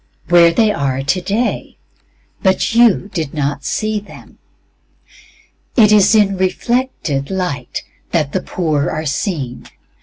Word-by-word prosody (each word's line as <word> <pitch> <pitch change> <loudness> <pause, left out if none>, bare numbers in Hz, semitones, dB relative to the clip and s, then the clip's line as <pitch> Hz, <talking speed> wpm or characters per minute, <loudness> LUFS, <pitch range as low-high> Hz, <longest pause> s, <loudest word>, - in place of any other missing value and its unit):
Where 170 -1 +6
they 215 +4 +2
are 135 -6 -2
today, 190 - -2 0.6
but 190 +1 +1
you 230 -4 +3
did 160 -5 -3
not 145 -1 -2
see 215 -1 -1
them. 205 - -15 1.4
It 215 -3 +6
is 210 +1 +5
in 200 -3 +3
reflected 185 - -1
light 180 -10 -3 0.3
that 155 -5 0
the 185 - -1
poor 155 -5 -1
are 155 +1 -4
seen. 140 - -3
185 Hz, 120 wpm, -17 LUFS, 145-210 Hz, 1.4 s, Where